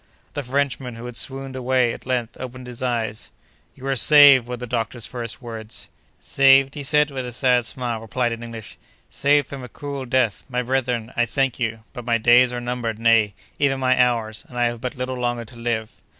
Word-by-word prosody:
The 145 Hz, -, -3 dB
Frenchman, 135 Hz, -2 st, -2 dB
who 115 Hz, +1 st, -9 dB
had 125 Hz, -1 st, -7 dB
swooned 135 Hz, +1 st, -2 dB
away, 130 Hz, -1 st, +1 dB
at -, -, -11 dB
length 125 Hz, -2 st, -1 dB
opened 130 Hz, 0 st, -7 dB
his 125 Hz, +1 st, -9 dB
eyes. 115 Hz, -4 st, -2 dB, 0.5 s
"You 135 Hz, -, -11 dB
are 135 Hz, 0 st, 0 dB
saved!" 140 Hz, -1 st, +7 dB
were 125 Hz, 0 st, -4 dB
the 125 Hz, -, -6 dB
doctor's 115 Hz, 0 st, -3 dB
first 120 Hz, 0 st, -6 dB
words. 110 Hz, -2 st, -7 dB, 0.3 s
"Saved!" 135 Hz, 0 st, +4 dB
he 150 Hz, -, -7 dB
with 145 Hz, -2 st, +1 dB
a 125 Hz, -, -6 dB
sad 125 Hz, -1 st, +2 dB
smile 120 Hz, -3 st, -3 dB
replied 120 Hz, +2 st, -1 dB
in 115 Hz, 0 st, -5 dB
English, 115 Hz, -2 st, -9 dB, 0.3 s
"saved 145 Hz, 0 st, +3 dB
from 135 Hz, -2 st, -8 dB
a 125 Hz, -, -8 dB
cruel 140 Hz, +1 st, -6 dB
death! 125 Hz, -4 st, +1 dB
My 125 Hz, -1 st, -1 dB
brethren, 125 Hz, -2 st, -1 dB
I 120 Hz, 0 st, +2 dB
thank 135 Hz, +1 st, 0 dB
you, 115 Hz, -2 st, -2 dB
but 125 Hz, -3 st, -7 dB
my 115 Hz, 0 st, +1 dB
days 120 Hz, +2 st, +5 dB
are 120 Hz, -, -3 dB
numbered, 120 Hz, -2 st, -3 dB
nay, 115 Hz, -3 st, +3 dB, 0.2 s
even 135 Hz, -2 st, +2 dB
my 130 Hz, -1 st, +3 dB
hours, 115 Hz, -3 st, -1 dB
and 125 Hz, -, -10 dB
I 120 Hz, -, +2 dB
have 120 Hz, -1 st, -1 dB
but 125 Hz, +3 st, -4 dB
little 130 Hz, 0 st, -4 dB
longer 120 Hz, -1 st, -2 dB
to 115 Hz, -, -14 dB
live." 115 Hz, -2 st, -3 dB
125 Hz, 205 wpm, -22 LUFS, 115-130 Hz, 0.5 s, saved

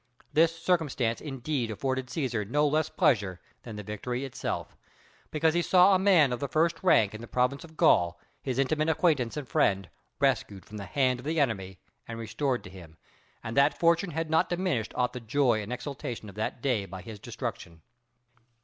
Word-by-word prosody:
This 165 Hz, +1 st, +3 dB
circumstance 150 Hz, -10 st, 0 dB
indeed 135 Hz, -3 st, -3 dB
afforded 130 Hz, +4 st, -2 dB
Cæsar 120 Hz, -7 st, -2 dB
no 150 Hz, +3 st, +3 dB
less 155 Hz, +1 st, +1 dB
pleasure 100 Hz, -, +1 dB, 0.2 s
than 115 Hz, -3 st, -9 dB
the 105 Hz, -, -6 dB
victory 120 Hz, +6 st, -4 dB
itself; 135 Hz, -, -4 dB, 0.5 s
because 160 Hz, +1 st, +2 dB
he 175 Hz, -, +2 dB
saw 185 Hz, +2 st, +5 dB
a 185 Hz, -, +4 dB
man 175 Hz, -9 st, +5 dB
of 120 Hz, -, -3 dB
the 140 Hz, -, -2 dB
first 160 Hz, +3 st, +1 dB
rank 110 Hz, -, +4 dB
in 110 Hz, -, -8 dB
the 120 Hz, -, -8 dB
province 125 Hz, +4 st, 0 dB
of 160 Hz, -1 st, -14 dB
Gaul, 85 Hz, 0 st, +4 dB, 0.2 s
his 130 Hz, -2 st, -3 dB
intimate 155 Hz, +3 st, +1 dB
acquaintance 155 Hz, -6 st, +1 dB
and 145 Hz, -4 st, -5 dB
friend, 95 Hz, -5 st, +1 dB, 0.3 s
rescued 95 Hz, -2 st, 0 dB
from 105 Hz, -, -9 dB
the 100 Hz, -, -6 dB
hand 130 Hz, -2 st, +1 dB
of 125 Hz, -, -11 dB
the 160 Hz, +1 st, 0 dB
enemy 95 Hz, -9 st, -1 dB, 0.3 s
and 115 Hz, -, -6 dB
restored 125 Hz, +3 st, -2 dB
to -, -, -10 dB
him, 85 Hz, -4 st, -13 dB, 0.5 s
and 115 Hz, -, -5 dB
that 140 Hz, +1 st, +4 dB
fortune 170 Hz, +2 st, +3 dB
had 165 Hz, 0 st, -3 dB
not 160 Hz, +1 st, +2 dB
diminished 175 Hz, -, -1 dB
aught 125 Hz, 0 st, +1 dB
of -, -, -25 dB
the 125 Hz, -, -6 dB
joy 120 Hz, -1 st, +1 dB
and 105 Hz, +3 st, -7 dB
exultation 125 Hz, -3 st, -5 dB
of -, -, -11 dB
that 110 Hz, +3 st, -4 dB
day 115 Hz, -8 st, 0 dB
by 95 Hz, 0 st, -8 dB
his 110 Hz, -1 st, -9 dB
destruction. 85 Hz, -4 st, -6 dB
130 Hz, 195 wpm, -28 LUFS, 110-155 Hz, 0.5 s, saw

